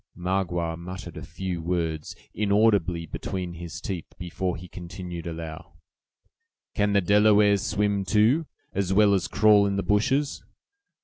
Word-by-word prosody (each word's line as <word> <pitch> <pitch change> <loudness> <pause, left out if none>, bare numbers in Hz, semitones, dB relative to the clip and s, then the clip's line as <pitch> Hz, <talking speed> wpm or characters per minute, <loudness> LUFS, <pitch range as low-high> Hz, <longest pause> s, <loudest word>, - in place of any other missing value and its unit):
Magua 90 -2 -1
muttered 90 +2 -8
a - - -7
few 90 -3 -5
words, 80 -3 -2 0.2
inaudibly, 100 -4 +2
between 90 +2 -5
his 85 -5 -7
teeth, 90 -5 -6
before 90 -1 -3
he 90 +3 -10
continued, 90 -1 -7
aloud: 80 0 -7 1.0
"Can 105 -1 +1
the 100 - +4
Delawares 105 +1 +4
swim, 100 -1 0
too, 115 - +3 0.3
as 95 -1 -1
well 100 +1 +5
as 90 -2 +1
crawl 105 -1 +5
in 100 - -1
the 100 - -1
bushes? 135 +8 +1
95 Hz, 135 wpm, -26 LUFS, 85-105 Hz, 1.0 s, well